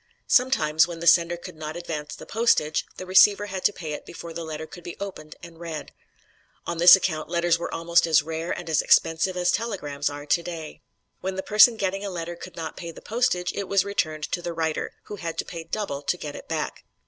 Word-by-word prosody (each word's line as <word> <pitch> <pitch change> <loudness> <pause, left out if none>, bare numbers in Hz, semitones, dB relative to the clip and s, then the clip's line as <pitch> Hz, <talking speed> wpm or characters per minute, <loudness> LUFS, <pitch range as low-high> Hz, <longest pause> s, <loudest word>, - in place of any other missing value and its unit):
Sometimes, 160 -11 +3
when 170 -1 -7
the 170 - -5
sender 170 0 +5
could 170 - -10
not 155 +1 -6
advance 160 -4 -5
the - - -11
postage, 190 -10 +1
the 185 - -6
receiver 200 +2 +6
had 190 -2 -5
to - - +5
pay 160 -6 -6
it - - -6
before 170 -1 -9
the 170 +1 -5
letter 160 -1 -5
could 175 +2 -12
be 175 - -8
opened 185 -6 -7
and 165 -1 -12
read. 165 -3 -6 0.7
On 170 -1 -4
this 175 +3 +10
account 160 -5 -2
letters 170 -1 +2
were - - -4
almost 170 0 +2
as 160 -2 +4
rare 160 +2 -4
and - - -4
as 160 -2 +2
expensive 165 +3 +3
as 180 0 +2
telegrams 150 -10 -2
are 145 0 -8
today. 165 0 -2 0.4
When 190 0 -3
the 190 - -3
person 215 +3 +6
getting 195 0 -2
a 200 - -3
letter 175 -2 -5
could 175 0 -11
not 160 -1 -6
pay 170 - -6
the 165 - -10
postage, 215 -6 0
it 200 -2 -4
was 195 -1 +2
returned 155 -6 -2
to 175 - -1
the 175 -1 -4
writer, 160 -1 -2
who 205 - -8
had 165 -3 -5
to - - -2
pay 165 -2 -7
double 165 -6 -3
to 160 +5 -1
get 150 -4 -7
it - - -10
back. - - -3
170 Hz, 225 wpm, -25 LUFS, 160-185 Hz, 0.7 s, this